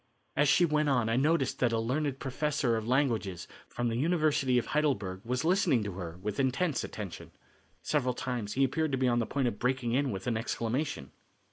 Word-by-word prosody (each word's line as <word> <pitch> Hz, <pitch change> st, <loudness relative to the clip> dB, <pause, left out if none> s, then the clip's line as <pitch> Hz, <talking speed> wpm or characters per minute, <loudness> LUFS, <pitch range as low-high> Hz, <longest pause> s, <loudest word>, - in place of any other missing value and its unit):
As 150 Hz, 0 st, +3 dB
she 175 Hz, -, +5 dB
went 150 Hz, -2 st, +1 dB
on 125 Hz, -5 st, +2 dB
I 115 Hz, -, +1 dB
noticed 140 Hz, 0 st, +1 dB
that 120 Hz, -2 st, +2 dB
a 115 Hz, -, +1 dB
learned 135 Hz, +4 st, -1 dB
professor 135 Hz, -3 st, 0 dB
of 110 Hz, 0 st, -3 dB
languages 120 Hz, -, 0 dB, 0.2 s
from 120 Hz, -, -2 dB
the 115 Hz, -, -1 dB
University 150 Hz, -3 st, +2 dB
of 120 Hz, -, +1 dB
Heidelberg 110 Hz, -12 st, 0 dB
was 125 Hz, +5 st, -2 dB
listening 170 Hz, -, +3 dB
to 100 Hz, -, -4 dB
her 90 Hz, -2 st, -7 dB
with 105 Hz, +2 st, -3 dB
intense 135 Hz, +3 st, +1 dB
attention. 100 Hz, -5 st, -7 dB, 0.5 s
Several 130 Hz, -5 st, 0 dB
times 120 Hz, -6 st, -3 dB
he 135 Hz, -, +2 dB
appeared 155 Hz, +3 st, 0 dB
to -, -, +2 dB
be 130 Hz, 0 st, +2 dB
on 120 Hz, -1 st, +2 dB
the 115 Hz, -, -1 dB
point 135 Hz, 0 st, 0 dB
of 115 Hz, -, -3 dB
breaking 125 Hz, -1 st, 0 dB
in 135 Hz, +3 st, +1 dB
with 95 Hz, -4 st, -5 dB
an 120 Hz, -3 st, 0 dB
exclamation. 115 Hz, -, -2 dB
125 Hz, 205 wpm, -30 LUFS, 115-145 Hz, 0.5 s, she